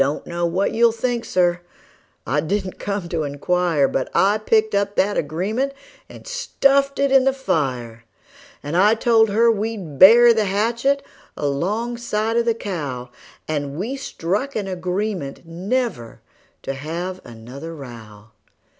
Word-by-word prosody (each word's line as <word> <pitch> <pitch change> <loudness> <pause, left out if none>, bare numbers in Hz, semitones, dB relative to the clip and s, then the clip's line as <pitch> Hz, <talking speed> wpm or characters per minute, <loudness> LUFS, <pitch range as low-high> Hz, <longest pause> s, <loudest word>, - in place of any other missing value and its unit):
I - - +8
don't 140 +2 -3
know 170 0 -1
what 185 +4 0
you'll 230 +1 +4
think, 235 +1 -2
Sir 175 -1 +1 0.6
I 145 +2 0
didn't 190 +4 -3
come 200 -3 -3
to 165 -2 -1
inquire 150 +1 +1
But 130 - -2
I 205 +3 +3
picked 220 0 +2
up 200 0 0
that 205 +2 +2
agreement 210 - -1 0.4
and - - -13
stuffed 280 - +1
it 280 -1 +1
in 270 -1 +6
the 270 0 +2
fire; 125 - -2 0.6
And 145 +3 -4
I 205 +5 +5
told 225 -1 +3
her 230 +3 +4
we'd 205 -9 -4
bury 235 +5 +9
the 220 -2 +1
hatchet 235 +8 0 0.3
alongside 215 +9 -1
of 235 0 +2
the 230 -1 +2
cow; 145 - -5 0.4
And 145 -2 -3
we 225 +10 -3
struck 260 0 -3
an 205 -3 -2
agreement 185 -4 -3
never 180 - -3 0.4
to 135 - -3
have 170 +7 -5
another 125 +8 -9
row. 115 -6 -12
195 Hz, 145 wpm, -21 LUFS, 150-230 Hz, 0.6 s, bury